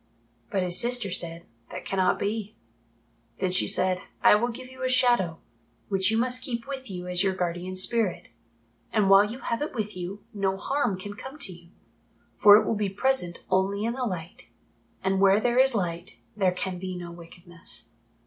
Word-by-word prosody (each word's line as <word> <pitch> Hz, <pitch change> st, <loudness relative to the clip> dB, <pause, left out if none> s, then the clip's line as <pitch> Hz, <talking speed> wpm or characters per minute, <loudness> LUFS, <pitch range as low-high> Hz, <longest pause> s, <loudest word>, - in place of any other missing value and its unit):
But 190 Hz, -2 st, 0 dB
his 180 Hz, -1 st, +2 dB
sister 240 Hz, -4 st, +3 dB
said, 170 Hz, -2 st, -1 dB, 0.2 s
"That -, -, -8 dB
cannot 190 Hz, -1 st, +1 dB
be." 215 Hz, 0 st, -3 dB, 0.8 s
Then 185 Hz, -1 st, -1 dB
she 185 Hz, -, +1 dB
said, 185 Hz, -1 st, +3 dB, 0.2 s
"I -, -, +8 dB
will 215 Hz, +3 st, +2 dB
give 250 Hz, +2 st, -7 dB
you 260 Hz, 0 st, -13 dB
a 255 Hz, -, 0 dB
Shadow, 240 Hz, -10 st, +3 dB, 0.5 s
which 190 Hz, -1 st, +2 dB
you 220 Hz, -, +1 dB
must 250 Hz, +2 st, +1 dB
keep 235 Hz, -2 st, -4 dB
with 265 Hz, -3 st, -6 dB
you 180 Hz, -2 st, -6 dB
as 180 Hz, 0 st, -1 dB
your 190 Hz, -1 st, +1 dB
guardian 180 Hz, +1 st, -3 dB
spirit. 195 Hz, 0 st, +2 dB, 0.6 s
And 205 Hz, -3 st, +2 dB
while 195 Hz, +1 st, +8 dB
you 240 Hz, -, -6 dB
have 235 Hz, -2 st, -3 dB
it 295 Hz, -, -4 dB
with 215 Hz, -3 st, -3 dB
you, 185 Hz, +3 st, -7 dB
no 195 Hz, -2 st, -1 dB
harm 240 Hz, -2 st, -1 dB
can 205 Hz, +2 st, -7 dB
come 265 Hz, +7 st, -10 dB
to 215 Hz, -11 st, -2 dB
you, 170 Hz, 0 st, -16 dB, 0.7 s
for 205 Hz, 0 st, +8 dB
it -, -, +1 dB
will -, -, 0 dB
be 205 Hz, -2 st, -1 dB
present 195 Hz, -4 st, 0 dB
only 195 Hz, +3 st, +1 dB
in 230 Hz, -, -1 dB
the 260 Hz, 0 st, -4 dB
Light, 185 Hz, +3 st, -6 dB, 0.5 s
and 190 Hz, 0 st, +1 dB
where 195 Hz, +1 st, +5 dB
there 240 Hz, +2 st, +1 dB
is 265 Hz, -2 st, +4 dB
Light 175 Hz, 0 st, -3 dB, 0.2 s
there 190 Hz, -3 st, +2 dB
can 180 Hz, 0 st, -4 dB
be 185 Hz, 0 st, -5 dB
no 175 Hz, -1 st, -7 dB
wickedness. 170 Hz, 0 st, -4 dB
195 Hz, 190 wpm, -26 LUFS, 180-235 Hz, 0.8 s, I